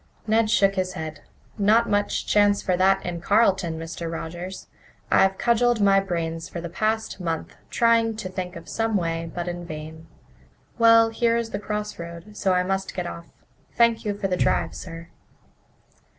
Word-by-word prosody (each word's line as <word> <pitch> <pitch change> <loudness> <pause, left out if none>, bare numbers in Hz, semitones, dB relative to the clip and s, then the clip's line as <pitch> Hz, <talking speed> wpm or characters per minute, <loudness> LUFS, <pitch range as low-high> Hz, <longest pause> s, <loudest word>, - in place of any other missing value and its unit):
Ned 220 0 +2
shook 195 -3 +4
his 185 -1 -2
head. 155 -2 -6 0.4
"Not 220 +3 +4
much 205 0 0
chance 205 -1 +3
for 185 - +1
that 190 +2 +3
in 175 -1 -4
Carleton, 190 -4 +2
Mr. 165 +1 -5
Rogers. 175 +3 -6 0.5
I've 190 0 +4
cudgelled 240 0 +2
my 195 -1 +5
brains 165 -3 -3
for 175 - -6
the 170 -1 -6
past 220 +3 -1
month 165 -3 -4
trying 230 -1 +3
to 215 -3 -5
think 185 -1 -5
of 170 - -10
some 225 -2 0
way, 165 -2 -2
but 175 +1 -4
in 175 0 -4
vain. 160 0 -8 0.7
Well, 230 0 +6
here 230 0 +2
is 230 -1 -3
the 200 - -3
crossroad, 210 -3 -6
so 195 - 0
I 180 0 +2
must 195 +1 -2
get 180 -2 -2
off. 170 -1 -7 0.5
Thank 235 -1 +3
you 205 -1 -2
for 200 - -1
the 180 -1 -1
drive, - - +1
sir." 165 -1 -9
190 Hz, 170 wpm, -24 LUFS, 170-215 Hz, 0.7 s, Well